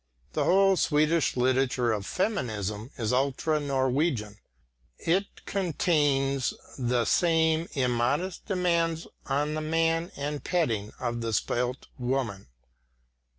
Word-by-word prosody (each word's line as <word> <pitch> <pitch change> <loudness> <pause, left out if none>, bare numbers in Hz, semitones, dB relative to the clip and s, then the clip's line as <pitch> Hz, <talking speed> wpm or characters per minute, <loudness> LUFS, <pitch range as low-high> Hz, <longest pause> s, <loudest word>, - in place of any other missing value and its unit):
The 150 - 0
whole 195 +2 +4
Swedish 155 -2 +2
literature 125 -1 +2
of 105 -2 -2
feminism 110 - -2
is 115 -2 -1
ultra 140 +4 +1
Norwegian; 130 -6 0 0.6
it 190 +5 -1
contains 145 -7 +1 0.2
the 120 -1 +1
same 160 -1 +2
immodest 135 +7 0
demands 170 -4 +1 0.2
on 145 +2 0
the 155 - -2
man 165 +2 +1
and 145 +1 -4
petting 115 - 0
of 120 -1 -2
the 115 -1 -2
spoilt 125 +4 -1
woman. 120 - -2
140 Hz, 110 wpm, -28 LUFS, 125-165 Hz, 0.6 s, whole